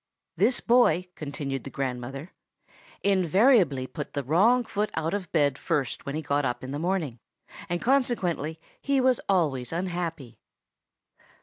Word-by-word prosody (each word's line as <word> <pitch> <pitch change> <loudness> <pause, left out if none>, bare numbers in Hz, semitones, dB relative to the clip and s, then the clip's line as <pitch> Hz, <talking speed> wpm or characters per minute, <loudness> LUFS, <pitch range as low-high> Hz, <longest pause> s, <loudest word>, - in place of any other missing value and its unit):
"This 215 +9 +2
boy," 185 -8 +3
continued 140 -4 -5
the - - -7
grandmother, 135 +4 -5 0.7
"invariably 190 - +3
put 145 +2 -7
the 140 - -2
wrong 210 - +4
foot 210 -2 -2
out 160 +2 -1
of 195 -4 -4
bed 145 -4 +2
first 140 -2 -2
when 140 - -3
he 155 - -3
got 145 0 0
up 125 -1 -2
in 130 - -6
the 145 - -3
morning, 165 -8 -1 0.5
and 175 0 -1
consequently 185 - 0 0.2
he 280 -1 +1
was 255 -1 +3
always 145 -10 +1
unhappy." 170 -7 -4
165 Hz, 140 wpm, -27 LUFS, 140-200 Hz, 0.7 s, wrong